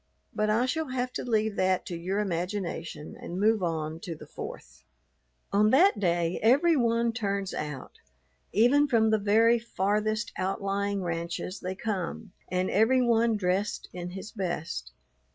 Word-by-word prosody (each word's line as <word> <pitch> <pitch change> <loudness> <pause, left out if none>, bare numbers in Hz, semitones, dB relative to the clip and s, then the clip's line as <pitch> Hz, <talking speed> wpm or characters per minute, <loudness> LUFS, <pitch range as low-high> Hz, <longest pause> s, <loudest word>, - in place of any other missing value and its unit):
But 215 0 0
I 225 +4 +3
shall 315 +4 -1
have 255 -1 -2
to - - -3
leave 220 -3 0
that 185 -1 +1
to 175 - -5
your 180 +4 -2
imagination 175 -5 -3
and 180 - -5
move 215 +1 +3
on 160 -2 -2
to 170 -1 -6
the - - -11
Fourth. - - -9 0.7
On 210 +2 +4
that 285 - +5
day 175 -2 +1
every 285 +9 +5
one 235 -2 +2
turns 200 -4 -2
out; 150 -3 -6 0.5
even 265 +7 +4
from 225 -4 +3
the 220 - +3
very 225 +3 +4
farthest 215 0 -1
outlying 200 +1 -1
ranches 170 +2 -3
they 185 +1 -4
come, 200 -1 -4 0.2
and 185 0 0
every 245 +5 +4
one 230 -1 +3
dressed 190 +2 -1
in 175 0 -5
his 190 +3 -8
best. 170 - -4
205 Hz, 150 wpm, -28 LUFS, 180-230 Hz, 0.7 s, that